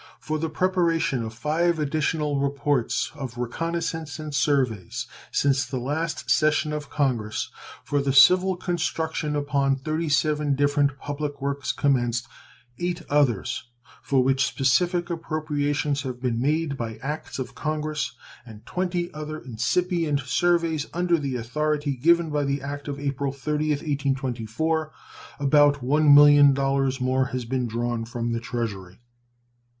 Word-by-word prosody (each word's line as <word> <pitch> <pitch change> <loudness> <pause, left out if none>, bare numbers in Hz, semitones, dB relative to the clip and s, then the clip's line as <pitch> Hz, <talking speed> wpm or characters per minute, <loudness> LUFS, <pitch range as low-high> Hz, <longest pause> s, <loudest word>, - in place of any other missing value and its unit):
For 155 0 -3
the 160 +1 -2
preparation 165 -5 +1
of 110 -1 -4
five 160 +8 0
additional 150 -1 0
reports 140 -2 0
of 135 -6 -7
reconnoissances 160 +4 -3
and 155 -1 -6
surveys 130 - 0 0.3
since 135 -2 +2
the 130 - -5
last 150 +6 -3
session 155 0 +2
of 150 -1 -5
Congress, 120 -7 -1 0.3
for 145 0 0
the 140 0 0
civil 180 +7 +6
construction 160 -3 -2
upon 140 -1 +1
37 150 0 0
different 145 0 +2
public 145 0 -4
works 140 0 -2
commenced, 120 -4 0 0.5
eight 175 0 -2
others 120 -6 +1 0.4
for 135 -2 +2
which 135 0 +2
specific 175 +6 +1
appropriations 150 -3 -1
have 130 -2 -5
been 120 -2 -1
made 150 +1 0
by 115 -2 -4
acts 150 +3 -4
of 130 - -5
Congress, 155 -3 -3 0.3
and 110 -3 -13
twenty 180 -1 -2
other 155 0 -5
incipient 150 - 0
surveys 160 +3 +1
under 175 -1 +2
the 140 -3 -3
authority 145 +4 -1
given 170 +4 +3
by 150 -1 0
the 140 0 -1
act 145 +1 -6
of 140 -1 -4
April 140 -1 -2
30th, 150 +2 -2
1824, 140 +2 -1 0.5
about 145 0 +4
$1,000,000 140 -1 +5
more 130 +1 +2
has 125 -1 -4
been 125 +1 -1
drawn 120 0 -2
from 120 0 -3
the 115 - -1
Treasury. 100 -6 -5
145 Hz, 130 wpm, -25 LUFS, 130-155 Hz, 0.5 s, civil